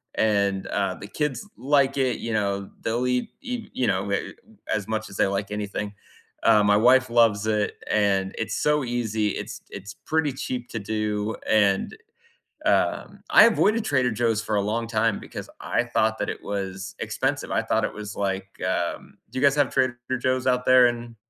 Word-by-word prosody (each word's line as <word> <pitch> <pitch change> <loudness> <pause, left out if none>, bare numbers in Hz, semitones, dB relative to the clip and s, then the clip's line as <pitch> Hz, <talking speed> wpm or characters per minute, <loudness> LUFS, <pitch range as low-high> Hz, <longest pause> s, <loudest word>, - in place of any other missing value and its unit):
and 100 -3 +1
uh, 95 -2 -1
the 100 - -10
kids 150 - -3
like 140 0 +2
it, 130 -2 +1
you 115 - -4
know, 100 -2 -1
they'll 120 +3 -1
eat 125 0 0
eat, 245 -4 -5
you 125 - 0
know, 95 +2 0 0.6
as 105 -3 -2
much 110 0 -3
as 95 - -9
they - - +3
like 100 +1 -2
anything. 105 0 -4 0.5
Uh, 105 - +5
my 105 0 +4
wife 125 +3 +5
loves 115 -3 +3
it, 105 -1 +1 0.2
and 100 -2 +1
it's 110 -1 -2
so 150 -1 +2
easy, 110 -4 -1
it's - - -5
it's 100 +1 -8
pretty 155 -3 +1
cheap 125 -2 -5
to - - -5
do, 105 0 -2
and 105 - +2 0.7
um, - - +1
I - - +8
avoided 220 -1 +3
Trader 130 - +2
Joe's 115 -1 +1
for 110 -1 -2
a 100 - +2
long 115 +3 -1
time 110 -1 +1
because - - -8
I 120 - 0
thought 110 -2 +1
that 105 - -1
it - - -6
was 95 -1 -4
expensive. - - -2
I - - +2
thought - - +1
it - - -4
was 105 -1 -7
like, 95 -1 -2 0.2
um 90 -2 -2
do 130 - -3
you 140 - +3
guys 140 0 +4
have 145 -3 +2
Trader 130 -2 +1 0.2
Joe's 130 +1 0
out 125 -1 +2
there 130 -1 +7
in 120 -1 -4
110 Hz, 185 wpm, -25 LUFS, 100-125 Hz, 0.7 s, I